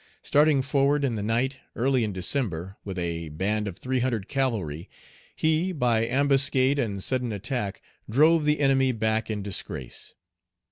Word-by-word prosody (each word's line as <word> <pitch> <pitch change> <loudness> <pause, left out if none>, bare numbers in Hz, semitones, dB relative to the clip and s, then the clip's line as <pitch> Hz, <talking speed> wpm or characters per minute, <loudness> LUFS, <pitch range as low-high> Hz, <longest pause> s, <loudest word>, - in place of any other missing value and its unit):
Starting 145 -2 +3
forward 140 +1 +2
in 130 - 0
the 110 - -3
night, 120 +6 0 0.2
early 130 0 +2
in 105 - -1
December, 95 - -2
with 95 -2 -6
a 85 -2 -3
band 100 +7 -1
of 95 -2 -6
three 130 +3 -1
hundred 120 -5 -1
cavalry, 110 - -2 0.5
he, 160 +4 +1
by 120 -8 +1
ambuscade 135 +1 +3
and 100 -6 -2
sudden 125 -3 0
attack, 105 0 -3 0.3
drove 155 +7 +4
the 150 0 +1
enemy 135 -1 +3
back 110 -1 0
in 105 -2 -3
disgrace. 95 -9 -6
120 Hz, 150 wpm, -26 LUFS, 100-135 Hz, 0.5 s, drove